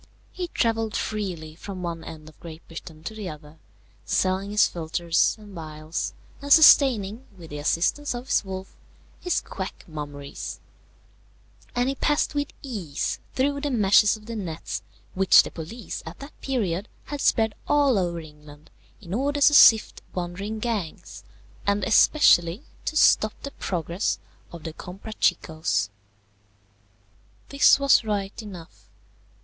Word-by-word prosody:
He 360 -1 -4
travelled 225 -7 0
freely 180 -8 -3
from 185 +2 -8
one 165 -1 -4
end 155 -1 -10
of 155 - -16
Great 165 -1 -11
Britain 160 -1 -10
to 220 - -5
the 210 -4 -6
other, 150 0 -12 0.4
selling 190 +1 0
his 210 0 +4
philtres 170 +2 0
and 210 -2 -13
phials, 155 -1 -5 0.3
and 285 0 -6
sustaining, 260 -7 +6
with 165 -3 -12
the 150 - -5
assistance 180 - 0
of 240 +1 -6
his 270 - +1
wolf, 190 -1 -7 0.4
his 360 - 0
quack 190 -1 -7
mummeries; 145 -3 -7 1.2
and 245 +1 +1
he 270 - 0
passed 295 +3 0
with 290 -1 -1 0.2
ease 200 - -3 0.2
through 280 +2 0
the 290 - -1
meshes 210 -3 +4
of 210 - -17
the 230 0 -6
nets 160 - -5 0.3
which 190 0 +6
the - - -7
police 175 +6 -7
at 165 +1 -9
that 280 +2 -12
period 205 -7 -1 0.2
had 290 -1 -6
spread 220 -2 +2
all 280 -7 +3
over 175 -2 -2
England 150 -1 -14 0.3
in 180 -3 -8
order 285 +5 0
to 290 +1 +6
sift 225 -6 +6
wandering 185 +4 -4
gangs, 190 - -4 0.4
and 200 0 +1
especially 215 - +4 0.2
to 310 - -2
stop 215 -7 +4
the 280 - -5
progress 175 - -2 0.3
of 170 -2 -10
the 160 - -6
Comprachicos. 160 - -1 1.6
This 280 0 +5
was 275 -3 +5
right 205 -1 -3
enough. 165 - -12
195 Hz, 140 wpm, -25 LUFS, 165-235 Hz, 1.6 s, sustaining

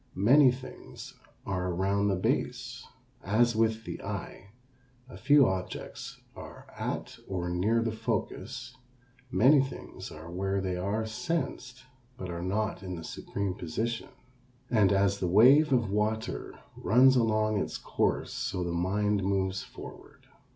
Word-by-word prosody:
Many 125 +8 +6
things 130 +1 -9 0.3
are 90 -2 -2
around 100 +3 +1
the 100 - +2
base. 90 - -2 0.4
As 115 +4 +2
with 110 0 +1
the - - -6
eye 100 - -6 0.6
a 130 - -11
few 145 -2 +5
objects 95 -1 -5 0.2
are - - -10
at - - -4
or 90 -2 -3
near 110 +6 +2
the 115 - -1
focus, 115 +2 -4 0.5
many 130 +8 +5
things 135 0 -7
are 80 +2 -10
where 95 +2 -1
they 95 -1 -2
are 100 +5 -1
sensed 130 +1 -3 0.3
but 90 -1 -6
are 85 0 -5
not 100 +4 -1
in 95 -2 -5
the 80 - -7
supreme 100 +3 -4
position. 110 +9 -3 0.6
And 105 -5 +4
as 100 0 +2
the 90 - 0
wave 130 - +6
of 120 -6 +2
water 110 +2 -2 0.2
runs 130 +4 +5
along 110 -3 +2
its - - -3
course - - -1
so 90 -2 -2
the 85 - -2
mind 100 +4 +1
moves 95 -1 0
forward. - - -12
105 Hz, 140 wpm, -29 LUFS, 95-115 Hz, 0.6 s, Many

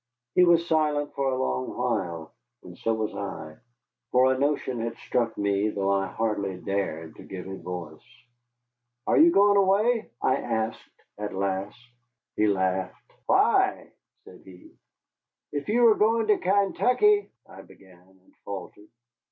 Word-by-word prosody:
He 180 - +5
was 170 -1 +4
silent 150 -2 0
for 135 -1 -1
a 130 - -1
long 65 0 -2
while, 95 -10 -2 0.3
and 90 - -11
so 115 - -2
was 110 -1 -2
I. 80 -6 -7 0.5
For 130 +1 +4
a 130 - -4
notion 140 -3 -1
had 115 0 -4
struck 115 -2 -2
me, 100 +1 +1
though 100 -2 -1
I 95 0 +1
hardly 100 -4 -2
dared 85 -3 -4
to - - -11
give 90 -2 -8
it 95 0 -8
voice. 85 -4 -7 1.0
"Are - - +3
you 325 +2 +8
going 205 -5 +5
away?" 210 +4 +2
I 130 - +2
asked 110 -1 -3 0.3
at 105 -2 -5
last. 95 +1 -2 0.6
He 105 - +2
laughed. 95 -2 -2
"Why?" - - +2 0.3
said 90 - -15
he. 90 -2 -15 0.8
"If 145 +5 -4
you 240 +3 +3
were 230 -2 +7
going 225 +2 +2
to 210 - +4
Kaintuckee 250 - +2
" - - -56
I - - -12
began, 95 -2 -19 0.2
and - - -28
faltered. 100 +1 -8
110 Hz, 150 wpm, -26 LUFS, -, 1.0 s, you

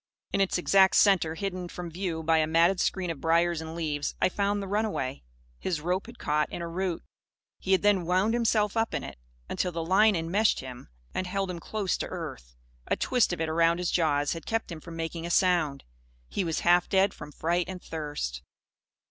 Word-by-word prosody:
In 195 - +2
its 195 - +2
exact 190 +2 +4
centre, 180 -6 +4
hidden 185 0 -4
from 175 -1 -7
view 170 -2 -3
by 160 0 +3
a 155 - +2
matted 170 +4 +3
screen 185 -3 0
of 160 - -8
briars 170 0 +2
and 160 0 -7
leaves, 150 -3 -2
I - - +3
found 200 +2 0
the 200 - -5
runaway. 200 -10 -1 0.4
His 175 -5 -2
rope 180 +6 -1
had 235 0 -11
caught 150 0 0
in 170 - -5
a - - -3
root. 180 +1 -3 0.6
He 190 - 0
had 190 - +3
then 195 -5 +3
wound 190 +5 +2
himself 220 -3 +1
up 225 0 0
in - - -2
it, - - -9 0.3
until 180 - -1
the 165 -1 -3
line 200 +4 +4
enmeshed 175 +6 +1
him 125 -2 -9 0.3
and 185 - -2
held 195 0 -2
him 175 - -6
close 200 0 -2
to - - -3
earth. - - -7 0.3
A - - +1
twist 250 -6 +2
of 175 - -3
it, 160 - 0
around 165 +1 +3
his 180 -1 -1
jaws, 145 -4 +1
had 165 - -8
kept 225 -4 -1
him 160 -2 -7
from 165 +1 -9
making 165 +1 -4
a - - -5
sound. 170 -6 +2 0.4
He 195 - -2
was 165 -3 -1
half 175 +1 +4
dead 195 0 +3
from 150 - -10
fright 170 +4 -1
and 185 -1 -5
thirst. 145 - -5
175 Hz, 210 wpm, -28 LUFS, 160-195 Hz, 0.6 s, exact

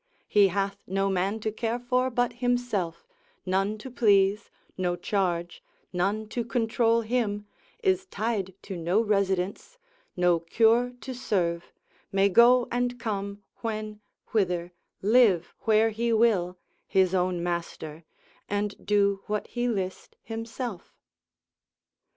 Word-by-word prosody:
he 205 -1 +5
hath 195 +1 -2
no 195 +1 0
man 195 +4 0
to 220 0 -2
care 225 +2 -2
for 250 +1 0
but 245 0 0
himself, 245 -8 -1 0.4
none 195 +3 0
to 255 +5 -9
please, 205 -2 +3 0.3
no 180 -1 0
charge, 175 -3 -1 0.3
none 200 +5 0
to 235 +2 -2
control 230 0 +1
him, 215 -3 -1 0.4
is 380 -1 +2
tied 205 - -2
to 195 - -6
no 175 +4 +1
residence, 200 - 0 0.4
no 180 -1 +3
cure 230 +8 +3
to 260 - -5
serve, 180 -9 -1 0.4
may 195 0 +4
go 240 +5 +6
and 245 0 -1
come, 200 -2 -4
when, 215 -2 -4 0.3
whither, 180 -5 0 0.3
live 210 -5 +4
where 220 +1 +4
he 230 +2 -1
will, 210 -6 +2 0.3
his 190 -1 +3
own 180 -1 +1
master, 170 -2 -4 0.5
and 205 0 -2
do 200 -1 +2
what 210 0 -1
he 245 0 -1
list 190 -5 -3
himself. 225 -2 -6
205 Hz, 125 wpm, -27 LUFS, 185-230 Hz, 0.5 s, go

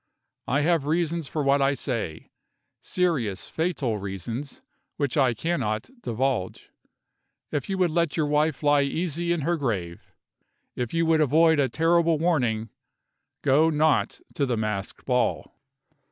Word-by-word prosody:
I 140 +4 +2
have 160 -2 +1
reasons 165 -1 0
for 150 0 -2
what 140 0 +3
I 140 +1 +2
say 115 - -4 0.5
serious, 140 - -1
fatal 145 -10 -1
reasons, 100 - -6 0.3
which 140 -4 -1
I 130 -5 +3
cannot 115 - -2
divulge. 120 - -2 0.8
If 145 - -3
you 195 - -1
would 180 -3 +2
let 170 -2 0
your 155 - +2
wife 150 0 +1
lie 145 -1 +4
easy 170 +4 -1
in 170 -2 0
her 170 +4 0
grave, 95 - -4 0.6
if 120 -2 -3
you 165 0 +1
would 160 -1 +3
avoid 160 +2 +4
a 135 -2 +2
terrible 165 +3 +2
warning, 125 -10 0 0.7
go 145 +4 +4
not 155 -1 +1
to 140 - 0
the 120 -2 0
masked 105 -2 -4
ball!" 125 -1 0
145 Hz, 140 wpm, -25 LUFS, 120-165 Hz, 0.8 s, lie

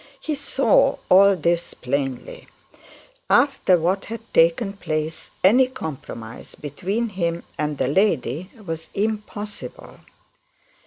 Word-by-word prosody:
He 310 - -3
saw 400 - +2
all 195 +1 +7
this 170 0 -1
plainly. 135 0 -3 0.8
After 275 -10 +4
what 185 +4 0
had 230 +1 -6
taken 170 +6 +3
place 155 -4 -4
any 245 +8 +6
compromise 145 - -8
between 195 - -3
him 170 -4 -2
and 150 -1 -2
the - - 0
lady 165 - +1 0.2
was 165 -1 -5
impossible. 210 0 -4
180 Hz, 105 wpm, -23 LUFS, 155-210 Hz, 0.8 s, all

